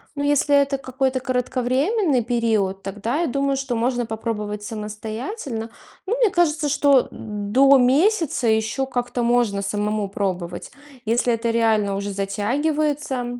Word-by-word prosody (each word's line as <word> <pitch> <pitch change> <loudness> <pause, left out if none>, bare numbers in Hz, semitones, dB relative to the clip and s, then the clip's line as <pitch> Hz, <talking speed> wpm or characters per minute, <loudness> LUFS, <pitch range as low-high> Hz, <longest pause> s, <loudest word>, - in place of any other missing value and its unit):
Но 285 - -2
если 290 0 +3
это 280 -1 +3
какой-то 260 0 -1
кратковременный 255 - 0
период, 220 -5 0
тогда 210 - -2
я 340 - +1
думаю, 275 +1 0
что 265 -3 -2
можно 240 +1 0
попробовать 210 -2 -4
самостоятельно. 225 - -5 0.3
Ну, 445 +6 0
мне 470 -4 +4
кажется, 310 -5 +1
что 280 -2 +4
до 225 +7 +2
месяца 285 - +2
ещё 220 +4 +1
как-то 245 -1 -2
можно 235 -4 +2
самому 210 0 -1
пробовать. 185 -3 -4 0.3
Если 235 +2 +1
это 230 +1 -1
реально 220 -3 +2
уже 200 0 -3
затягивается, 255 +5 -1
245 Hz, 130 wpm, -22 LUFS, 215-275 Hz, 0.3 s, мне